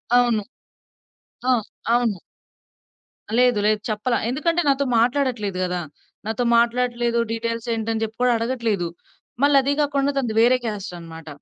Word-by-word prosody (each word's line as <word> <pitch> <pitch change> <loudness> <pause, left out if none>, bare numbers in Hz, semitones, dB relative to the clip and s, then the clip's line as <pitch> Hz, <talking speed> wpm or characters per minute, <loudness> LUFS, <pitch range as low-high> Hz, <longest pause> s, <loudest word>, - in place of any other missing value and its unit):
అవును. 240 -4 +3 1.1
ఆ! - - +6 0.4
అవును. 235 -6 +1 1.2
లేదు 250 -3 +4
లేదు. 215 0 +2
చెప్పల. 215 +3 -1 0.2
ఎందుకంటే 330 +7 +1
నాతో 280 0 +2
మాట్లాడట్లేదు 240 -6 0
గదా! 180 -1 -2 0.5
నాతో 225 +2 -1
మాట్లాడట్లేదు 240 0 +1
డీటెయిల్స్ 230 0 -3
ఏంటని 225 0 -2
జెప్పి 220 0 -5
కూడా 250 -1 +4
అడగట్లేదు. 230 -6 -1 0.6
మళ్ళదే 280 -1 +4
గాకుండా 285 -1 +1
తనది 245 -5 0
వేరే 245 +2 +5
క్యాస్ట్ 205 -5 -4
అన్నమాట. 165 -1 -11
235 Hz, 120 wpm, -22 LUFS, 215-255 Hz, 1.2 s, ఆ